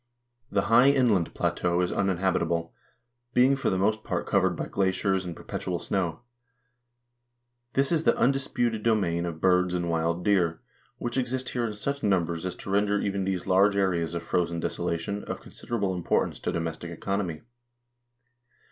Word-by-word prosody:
The 100 -1 +1
high 120 +4 +6
inland 120 -11 +2
plateau 90 0 0
is 90 - 0
uninhabitable, 90 -3 0 0.6
being 130 +3 +5
for 135 - 0
the 95 - 0
most 110 +3 +1
part 90 -2 -2
covered 95 -3 +2
by - - -3
glaciers 95 0 0
and 85 -2 -5
perpetual 90 -2 -4
snow. 85 -2 -2 1.5
This 135 +3 +2
is 160 -2 +2
the - - +4
undis 135 +1 +1
puted 115 -3 0
domain 90 -7 +1
of 80 -2 -5
birds 90 0 +3
and 85 -1 -1
wild 85 +2 0
deer, 90 -5 +2 0.4
which 120 +1 -4
exist 130 0 -1
here 120 -2 -1
in 110 - -4
such 140 +7 -3
num 95 -5 +2
bers 85 +2 -4
as 90 - -4
to 95 - -7
render 100 +1 +2
even 100 -1 -1
these 95 -2 -2
large 100 +2 +4
areas 85 -4 0
of 85 - -3
frozen 85 0 0
desolation 85 +5 -2
of - - -4
con - - -15
siderable 100 -6 -2
importance 90 - 0
to - - -2
domestic 85 0 -4
economy. 85 -1 -3
95 Hz, 165 wpm, -27 LUFS, 85-105 Hz, 1.5 s, high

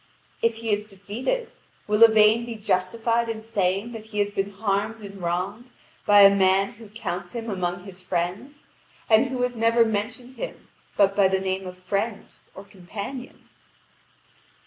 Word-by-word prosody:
If 230 -1 +2
he 225 -1 -3
is 210 +1 -2
defeated, 235 - -4 0.3
will 210 +1 0
Yvain 220 0 +7
be 235 -1 -6
justified 225 +4 0
in 220 -1 -4
saying 200 0 -1
that 225 -2 -8
he 220 -1 -9
has 205 0 +1
been 195 0 -2
harmed 205 +2 -2
and 200 -1 -9
wronged 190 +8 -3 0.4
by 205 0 +8
a 200 0 +8
man 195 0 +3
who 220 -1 -14
counts 205 -3 -5
him 230 -2 -4
among 180 -2 -2
his 190 -1 -10
friends, 185 +11 -3 0.5
and 220 +4 +6
who 255 -1 -2
has 250 0 -1
never 230 +1 +4
mentioned 225 +4 -3
him - - -7 0.3
but 195 -1 +4
by 200 -2 +5
the 190 0 +1
name 190 0 -2
of 180 0 -8
friend 200 +4 -2 0.3
or 195 - -9
companion? 200 +7 -8
210 Hz, 165 wpm, -25 LUFS, 195-230 Hz, 0.5 s, by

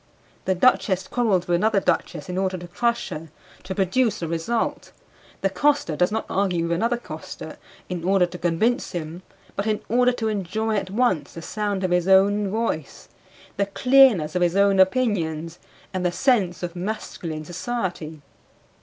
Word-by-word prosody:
The 190 - +1
duchess 190 -3 +2
quarrels 215 -8 +1
with 175 - +2
another 215 +2 +2
duchess 195 - -1
in 180 - -4
order 190 0 0
to 175 0 -9
crush 235 +6 -1
her, 165 -2 -7 0.3
to 190 +1 -6
produce 205 +2 +1
a - - -1
result; 165 +8 -2 0.5
the 195 - +2
coster 280 - +1
does 180 +4 +2
not 220 - -2
argue 185 -3 0
with 170 - -2
another 230 +8 +1
coster 240 - -9 0.3
in 175 -2 -4
order 190 0 +3
to 175 0 -9
convince 180 +10 0
him, 170 0 -5 0.3
but 200 +2 -2
in 215 -1 0
order 250 +2 +4
to 230 -2 -2
enjoy 215 +2 -1
at 195 -2 -2
once 195 - 0
the 165 - -8
sound 205 -1 -2
of 185 - 0
his 180 0 +2
own 200 +1 +4
voice, 215 -8 -3 0.5
the 200 0 +1
clearness 245 - +4
of 180 - 0
his 175 0 +2
own 200 -1 +4
opinions 175 -7 +1 0.3
and 185 -1 -2
the 180 - +1
sense 195 -6 +1
of 175 0 -4
masculine 175 -5 -5
society. 175 - -4
190 Hz, 170 wpm, -23 LUFS, 175-220 Hz, 0.5 s, order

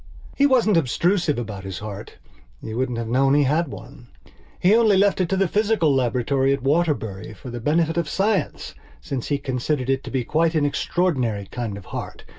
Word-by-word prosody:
He 280 - +4
wasn't 235 -8 +3
obtrusive 165 +2 +1
about 105 -5 -5
his 95 -2 -6
heart. 105 -1 -8 0.4
You 110 - -7
wouldn't 125 -1 -1
have 115 -1 -3
known 135 +4 +3
he 145 - +4
had 155 +5 +1
one. 120 -1 -11 0.5
He 190 +5 +4
only 220 -4 +4
left 200 -1 +3
it 175 - 0
to 195 - 0
the 195 -1 +2
physical 205 -6 +2
laboratory 130 +1 +1
at 140 -2 -3
Waterbury 135 - -1
for 120 +6 -9
the 120 - -5
benefit 160 +6 +1
of 170 -3 -1
science, 195 -4 -1 0.3
since 125 - -5
he 145 - 0
considered 135 0 -2
it 135 0 -1
to - - -6
be 130 -2 -1
quite 160 +5 +1
an 150 -2 +2
extraordinary 130 - 0
kind 115 -5 -4
of 100 - -11
heart. - - -7
140 Hz, 195 wpm, -23 LUFS, 120-170 Hz, 0.5 s, He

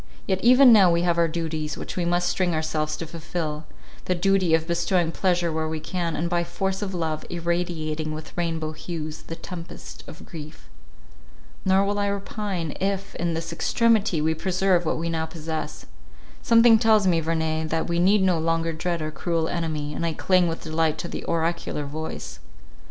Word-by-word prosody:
Yet 190 0 -1
even 250 +1 +8
now 195 -5 +7
we 170 0 +2
have 170 -1 +2
our 170 - +4
duties, 155 -2 -3
which - - -6
we 180 - -1
must 175 +1 +1
string 175 -1 +1
ourselves 155 -1 -1
to 165 - -5
fulfil: 160 -1 -4 0.4
the 180 - +1
duty 185 -2 +3
of 160 0 -1
bestowing 170 0 +1
pleasure 175 -2 +1
where 160 0 -1
we 160 0 -3
can, 170 0 -3
and 170 - -1
by 175 0 +1
force 190 +3 -2
of 195 -2 -3
love, 160 -3 -2
irradiating 170 -3 -2
with 155 0 -8
rainbow 165 -2 -2
hues 155 -1 -6
the 165 - -7
tempest 170 -1 -9
of 155 - -11
grief. 155 -2 -10 1.0
Nor 190 +1 +4
will 205 +1 -1
I 205 - +1
repine 200 -4 -3
if 195 0 -1
in 170 -1 -1
this 165 +1 -4
extremity 215 -3 +2
we 160 +1 +2
preserve 180 +1 +1
what - - 0
we 165 +1 -2
now 160 -1 -1
possess. 155 -1 -5 0.6
Something 230 -1 +6
tells 220 -3 +4
me, 175 -3 +3
Verney, 160 -1 -1
that 160 +1 -1
we 170 0 0
need 190 +3 +4
no 180 -3 +3
longer 165 0 0
dread 170 0 -2
our 155 - -3
cruel 165 0 -1
enemy, 155 -3 -2
and 165 - -3
I 165 -1 0
cling 185 +2 +3
with 165 0 -4
delight 160 -1 0
to 170 +2 -5
the - - -5
oracular 165 -2 -1
voice. 140 - -6
170 Hz, 185 wpm, -25 LUFS, 160-185 Hz, 1.0 s, even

